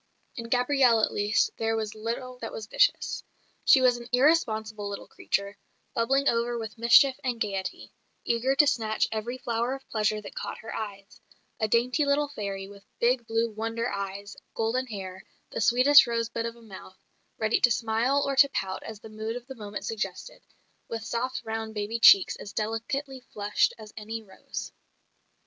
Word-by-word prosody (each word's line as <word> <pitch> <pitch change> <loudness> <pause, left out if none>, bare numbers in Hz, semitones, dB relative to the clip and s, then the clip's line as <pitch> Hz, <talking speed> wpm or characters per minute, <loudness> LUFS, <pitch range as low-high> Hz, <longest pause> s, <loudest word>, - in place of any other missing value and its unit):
In 230 -1 -6
Gabrielle 250 -2 +4
at - - +1
least 205 +1 +1
there 225 0 0
was 220 -2 -3
little 240 +3 -5
that 225 - -5
was 220 - -6
vicious. - - +1 0.4
She 265 - +6
was 250 -1 +4
an 240 0 -10
irresponsible 220 -7 +2
little 200 - -6
creature, 200 0 -3 0.3
bubbling 270 +5 +1
over 235 +1 +1
with 220 -2 -6
mischief 255 +3 +6
and 245 -3 -2
gaiety, 195 -3 -4 0.3
eager 245 +3 +1
to 295 - +6
snatch 225 -6 +1
every 225 +3 -3
flower 240 +1 -1
of 270 - -13
pleasure 215 -1 +1
that 210 - -10
caught - - -5
her 225 - -8
eyes; 200 -2 -7 0.4
a 220 - +1
dainty 245 +7 +2
little 285 +1 +2
fairy 200 -7 -5
with 200 0 -14 0.2
big 240 0 +2
blue 225 0 0
"wonder" 225 +2 -3
eyes, 200 +1 -5 0.2
golden 240 +4 0
hair, 190 -4 -7 0.3
the - - -3
sweetest 255 +4 +7
rosebud 230 0 -2
of 230 - -7
a 235 - -17
mouth, 190 -3 -12 0.4
ready 220 0 +1
to 245 - +6
smile 235 +4 +1
or 275 - -1
to 280 +1 +7
pout 190 -7 -3
as 220 -2 -9
the 220 - -11
mood 220 +1 -5
of 245 -1 -7
the 265 - -8
moment 210 -4 -7
suggested, 220 0 -5 0.5
with 225 -1 -5
soft 250 +3 -2
round 220 0 -4
baby 210 +2 -2
cheeks 370 +9 +7
as 205 - -9
delicately 260 +6 -3
flushed 210 -4 0
as 215 -2 -12
any 220 +1 -5
rose. 190 -2 -8
230 Hz, 175 wpm, -27 LUFS, 215-250 Hz, 0.5 s, sweetest